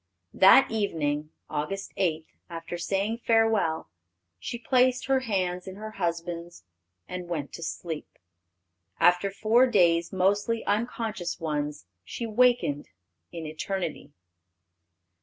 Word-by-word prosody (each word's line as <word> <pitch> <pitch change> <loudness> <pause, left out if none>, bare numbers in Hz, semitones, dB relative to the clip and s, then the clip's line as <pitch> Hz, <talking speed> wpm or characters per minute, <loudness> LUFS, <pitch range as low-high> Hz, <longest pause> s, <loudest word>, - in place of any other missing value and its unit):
That 195 +8 +7
evening, 155 -8 -1 0.2
Aug. 155 +6 -3
8, 160 -4 0 0.2
after 165 0 -6
saying 195 +6 -1
farewell, 225 -9 +2 0.5
she 235 - -5
placed 250 +1 +2
her 270 0 +3
hand 185 -7 -2
in 190 - -7
her 215 +2 -7
husband's, 170 -2 -4 0.4
and 180 -1 -6
went 155 -5 -4
to - - -8
sleep. 160 -1 -5 0.8
After 175 +3 +4
four 220 +6 +3
days, 170 -7 +3
mostly 205 +4 +1
unconscious 215 -5 -2
ones, 150 - -3 0.2
she 230 - -5
wakened 235 - +2 0.4
in 165 -2 -6
eternity. 155 -1 -4
185 Hz, 110 wpm, -27 LUFS, 165-220 Hz, 0.8 s, That